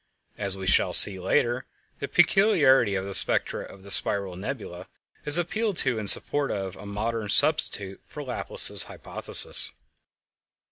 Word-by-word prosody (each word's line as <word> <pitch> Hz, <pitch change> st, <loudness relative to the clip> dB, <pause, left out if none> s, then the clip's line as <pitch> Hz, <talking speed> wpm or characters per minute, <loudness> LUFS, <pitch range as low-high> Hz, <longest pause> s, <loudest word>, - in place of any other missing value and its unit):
As 100 Hz, -2 st, -3 dB
we 95 Hz, -, -8 dB
shall 95 Hz, -, +1 dB
see 95 Hz, -2 st, +7 dB
later, 120 Hz, +6 st, -2 dB, 0.3 s
the 140 Hz, -, -6 dB
peculiarity 155 Hz, -, +2 dB
of 95 Hz, 0 st, -4 dB
the 100 Hz, -, -8 dB
spectra -, -, -1 dB
of 95 Hz, -, -15 dB
the 100 Hz, -, -10 dB
spiral 100 Hz, -2 st, 0 dB
nebulæ 95 Hz, -4 st, -9 dB, 0.4 s
is 150 Hz, +2 st, +5 dB
appealed 200 Hz, +3 st, -3 dB
to 130 Hz, -4 st, -1 dB
in 105 Hz, -, -7 dB
support 145 Hz, +7 st, +3 dB
of 95 Hz, -2 st, -6 dB
a 100 Hz, -, -13 dB
modern 105 Hz, +1 st, -5 dB
substitute 100 Hz, -8 st, 0 dB
for -, -, -10 dB
Laplace's -, -, +1 dB
hypothesis. -, -, 0 dB
105 Hz, 145 wpm, -24 LUFS, 95-140 Hz, 0.4 s, see